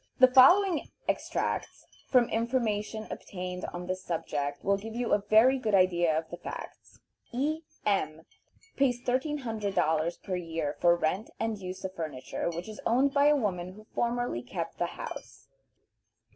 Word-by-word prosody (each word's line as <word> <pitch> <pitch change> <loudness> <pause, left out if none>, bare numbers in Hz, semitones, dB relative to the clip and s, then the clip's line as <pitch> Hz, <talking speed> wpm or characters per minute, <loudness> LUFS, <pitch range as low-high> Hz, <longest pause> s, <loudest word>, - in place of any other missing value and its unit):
The 255 -1 +6
following 350 +6 +6 0.2
extracts - - -2 0.2
from 250 -3 +4
information 225 -2 -1
obtained 180 -1 -5
on 175 0 -6
this 185 +1 -3
subject 145 -4 -3
will 200 - +4
give 220 +3 -7 0.2
a 205 - +4
very 250 +5 +6
good 215 -4 +1
idea 175 -4 +3
of 160 0 -2
the 175 - -5
facts: 175 - -9 0.3
E. 300 +6 -1 0.2
M. 160 -6 0 0.5
pays 255 -3 +2
$1300 220 - 0
per 185 - -2
year 165 -4 -3
for 170 0 +5
rent 175 +6 -1
and 225 -2 -1
use 185 0 -7
of 190 - -4
furniture, 155 -3 -4
which 170 +3 -5
is 215 -1 -8
owned 265 +4 +3
by 285 +1 +5
a 295 - +6
woman 185 -8 -2
who 215 +2 -14
formerly 240 - -1
kept 165 +6 -5
the 175 - +1
house. - - -8
200 Hz, 150 wpm, -29 LUFS, 175-245 Hz, 0.5 s, The